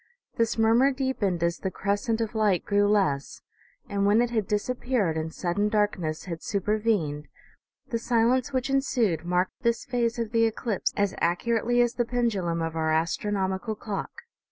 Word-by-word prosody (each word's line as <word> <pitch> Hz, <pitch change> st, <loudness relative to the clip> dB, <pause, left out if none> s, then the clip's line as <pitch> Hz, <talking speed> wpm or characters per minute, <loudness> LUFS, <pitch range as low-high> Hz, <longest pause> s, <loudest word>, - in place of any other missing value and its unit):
This 230 Hz, 0 st, 0 dB
murmur 230 Hz, +5 st, +4 dB
deepened 255 Hz, -10 st, -1 dB
as 170 Hz, 0 st, 0 dB
the 190 Hz, -, -2 dB
crescent 210 Hz, +5 st, -1 dB
of 225 Hz, 0 st, -2 dB
light 210 Hz, -5 st, +1 dB
grew 205 Hz, 0 st, +3 dB
less, 190 Hz, -10 st, 0 dB, 0.4 s
and 200 Hz, 0 st, -1 dB
when 205 Hz, +2 st, +4 dB
it 240 Hz, 0 st, +1 dB
had 220 Hz, -5 st, 0 dB
disappeared 215 Hz, -3 st, 0 dB
and 160 Hz, 0 st, -3 dB
sud 175 Hz, +2 st, -3 dB
den 205 Hz, +1 st, +2 dB
darkness 205 Hz, -7 st, 0 dB
had 170 Hz, -3 st, -6 dB
supervened, 200 Hz, -7 st, -1 dB, 0.6 s
the 230 Hz, -3 st, -1 dB
silence 240 Hz, +3 st, +2 dB
which 260 Hz, -2 st, -1 dB
ensued 235 Hz, -, +1 dB
marked 180 Hz, +5 st, -1 dB
this 235 Hz, -2 st, 0 dB
phase 240 Hz, -1 st, 0 dB
of 230 Hz, -2 st, -3 dB
the 230 Hz, -1 st, +3 dB
eclipse 225 Hz, -1 st, -1 dB
as 200 Hz, -2 st, +1 dB
accurately 230 Hz, +7 st, +1 dB
as 240 Hz, -1 st, -1 dB
the -, -, -1 dB
i$8 -, -, +1 dB
OMEGA. -, -, -25 dB
pendulum 200 Hz, -9 st, 0 dB
of 165 Hz, 0 st, -3 dB
our 160 Hz, -1 st, 0 dB
astronomical 190 Hz, +5 st, -1 dB
clock. 215 Hz, -, -6 dB
210 Hz, 175 wpm, -26 LUFS, 180-235 Hz, 0.6 s, murmur